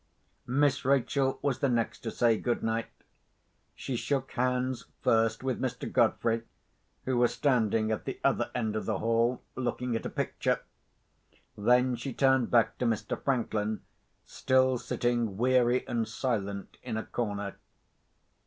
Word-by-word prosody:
Miss 140 +2 +2
Rachel 135 0 +2
was 140 -3 0
the 140 - +2
next 115 -2 0
to 115 - -4
say 115 0 +3
good 120 +2 -1
night. 115 0 -1 0.9
She 130 - -4
shook 135 +2 -1
hands 125 0 -1 0.2
first 115 +1 +2
with 130 -2 -1
Mr. - - -3
Godfrey, 115 0 +2 0.6
who 130 -1 0
was 120 -1 +3
standing 110 -5 +2
at 110 - -2
the - - -4
other - - +2
end 110 -1 -1
of 110 - -3
the 110 -3 0
hall, 115 +3 +1
looking 125 -1 -2
at 115 - -2
a - - -5
picture. - - -1 0.9
Then 125 +4 +3
she 125 +2 -5
turned 130 -1 +3
back 115 -2 +3
to 125 - 0
Mr. 110 -2 -2
Franklin, 110 -5 0 0.4
still 130 -1 +2
sitting 120 -6 -1
weary 125 +1 +3
and 115 -3 -1
silent 100 -4 -3
in 115 -3 -4
a 110 - -2
corner. 100 -4 -3
120 Hz, 145 wpm, -29 LUFS, 110-130 Hz, 0.9 s, say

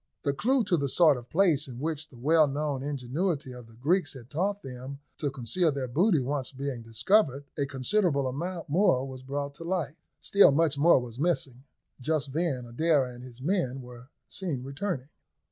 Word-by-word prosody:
The 140 -3 +1
clue 255 - +2
to 190 -4 +2
the 140 -2 -1
sort 155 0 +5
of 120 0 -10
place 165 -5 +3
in 125 -3 -8
which 155 +2 -3
the 125 - -15
well 155 +5 +4
known 145 -1 -2
ingenuity 145 +2 -2
of 125 -2 -10
the 115 - -17
Greeks 150 +5 +1
had 125 -1 -12
taught 195 +6 -1
them 130 +1 -7 0.2
to 145 - 0
conceal 135 +6 0
their 135 -2 -3
booty 170 - +3
once 135 0 -2
being 135 -2 -4
discovered, 135 - +2
a 140 -2 -1
considerable 140 +2 +1
amount 170 +6 -4
more 145 -5 +3
was 130 -1 -8
brought 140 +2 -4
to - - -8
light. 170 -4 -2 0.2
Still 200 -6 +6
much 150 0 +2
was 130 -6 +3
missing. 140 -6 -1 0.3
Just 140 0 -1
then 150 -6 -1
Adair 140 +4 +2
and 125 0 -9
his 125 0 -11
men 135 -7 0
were 125 +1 -12 0.2
seen 160 -10 -4
returning. 140 0 -4
140 Hz, 180 wpm, -28 LUFS, 130-165 Hz, 0.3 s, Still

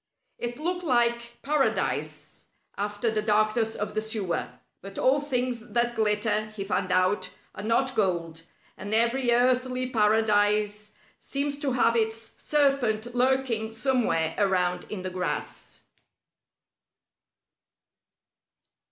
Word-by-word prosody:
It 240 0 -3
looked 355 +4 -2
like 235 -4 +1
Paradise 290 0 -1 0.3
after 205 +3 -1
the 215 -1 0
darkness 215 +1 +1
of 210 0 -4
the 215 - 0
sewer; 210 -6 -2 0.3
but 195 +1 -10
all 265 +3 +3
things 250 -5 -2
that 240 0 +1
glitter, 210 0 +1
he 200 - -4
found 185 -2 -1
out, 185 +1 +2 0.2
are - - -7
not 235 +5 +1
gold, 170 -5 -1 0.3
and 205 +2 -3
every 240 +2 +2
earthly 255 +1 +2
Paradise 210 -1 +2 0.3
seems 280 +1 -3
to 275 -3 -1
have 235 -2 +3
its 225 0 -1
serpent 250 -6 +1
lurking 250 -3 +1
somewhere 225 - 0
around 180 -3 +1
in 195 -4 -4
the 185 - -4
grass. 180 0 -5
225 Hz, 115 wpm, -27 LUFS, 205-250 Hz, 0.3 s, all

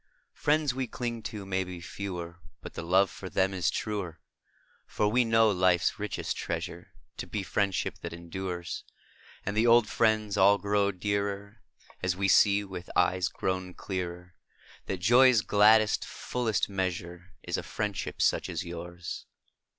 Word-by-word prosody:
Is - - -50
a - - -25
F - - -15
riends 150 -2 +3
xv)e 130 -1 -3
clinq 120 -2 -4
to 105 -3 -5
mau 95 -1 0
be 90 -1 -7
fe^Oer, 85 -1 -6 0.3
But - - -8
the - - -5
loOe 95 +4 +4
jor 95 -1 -9
them 95 +1 +1
is 90 -3 +1
truer; 100 -7 -3 0.7
fbr 105 +2 +1
\Oe 125 - +5
know 115 -1 +5
life 90 -2 +3
s - - 0
richest 105 -1 -3
treasure - - -4 0.3
To - - -5
be 105 -2 -3
friendship 95 0 -1
that 85 - -6
em 85 0 -10
dures, 90 -2 -4 0.6
And 100 - -2
the 110 +2 +3
old 120 -1 +6
jriends 110 -2 +1
all 100 +1 +6
qroxO 100 -2 0
dearer 100 0 -2 0.2
& - - -25
As 90 -1 0
vOe 100 +2 -1
see 100 +1 +5
\oith 95 -3 -8
eues 90 +1 +2
qro\On 95 -1 -3
clearer 90 -1 -5 0.5
That 95 -2 -3
joq's 120 +3 +6
gladdest, 105 +1 +5
fullest 115 -5 -1
measure 90 -2 -4
' - - -42
Is - - 0
a - - -2
friendship 105 -2 -3
such - - +1
as 85 -1 -3
Ljours. 85 0 -7
95 Hz, 175 wpm, -29 LUFS, 90-105 Hz, 0.7 s, old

